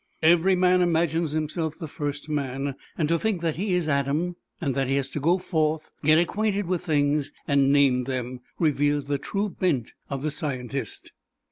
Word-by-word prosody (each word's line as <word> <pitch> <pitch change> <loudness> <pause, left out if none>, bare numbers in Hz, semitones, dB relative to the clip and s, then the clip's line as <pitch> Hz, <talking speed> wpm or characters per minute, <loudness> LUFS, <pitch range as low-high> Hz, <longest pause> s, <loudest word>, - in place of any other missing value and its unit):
Every 175 +3 +5
man 180 0 +4
imagines 165 -2 +1
himself 155 0 -2
the 165 - -6
first 145 -1 -4
man, 140 -2 -2 0.2
and 155 - +1
to 165 +1 +2
think 210 -4 -1
that 165 -3 -1
he 190 0 0
is 175 -3 0
Adam 150 +5 0 0.2
and 140 -5 -1
that 135 0 0
he 135 - +1
has 140 -1 0
to 150 - -4
go 170 +6 +3
forth, 160 -4 -1
get 155 +1 +5
acquainted 205 +3 +1
with 180 -1 -1
things 145 -1 +1 0.2
and 140 -1 +3
name 135 -3 +4
them, 125 -1 -3 0.2
reveals 145 -2 +1
the 140 0 -1
true 200 +8 -2
bent 165 - -1 0.2
of 140 -1 -4
the 155 - 0
scientist. 135 -3 -4
155 Hz, 180 wpm, -25 LUFS, 140-170 Hz, 0.2 s, Every